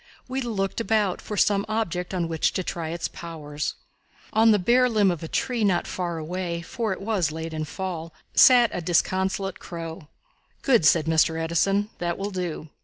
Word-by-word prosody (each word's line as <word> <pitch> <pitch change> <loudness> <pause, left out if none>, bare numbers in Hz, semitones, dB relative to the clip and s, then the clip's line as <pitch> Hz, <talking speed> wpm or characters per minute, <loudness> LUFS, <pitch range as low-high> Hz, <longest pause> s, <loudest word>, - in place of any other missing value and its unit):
We 260 +1 -2
looked 215 -3 -2
about 215 -4 +1
for 210 - -6
some 200 -1 +3
object 180 -5 -2
on 180 -3 -1
which 160 -1 0
to 185 - -1
try 165 -2 -4
its 170 +1 -3
powers. 150 -3 -5 0.6
On 225 +1 +5
a 210 - +5
bare 245 +6 +3
limb 210 -4 +3
of 175 - -4
a 165 - -5
tree 245 +3 -1
not 185 -4 +2
far 175 -2 -3
away, 170 +1 -4
for 230 +2 -3
it 190 - -3
was 195 -7 0
late 160 +1 -5
in 155 - -3
the - - -2
Fall, 170 -2 -5 0.2
sat 245 -3 +7
a 180 - -3
disconsolate 190 +2 0
crow. 165 -3 -7 0.6
"Good," 235 - +4
said 160 -1 +4
Mr. 160 0 +2
Edison, 195 +6 +1
"that 175 -1 -2
will 200 +1 -3
do." 175 -4 -4
180 Hz, 185 wpm, -25 LUFS, 165-210 Hz, 0.6 s, sat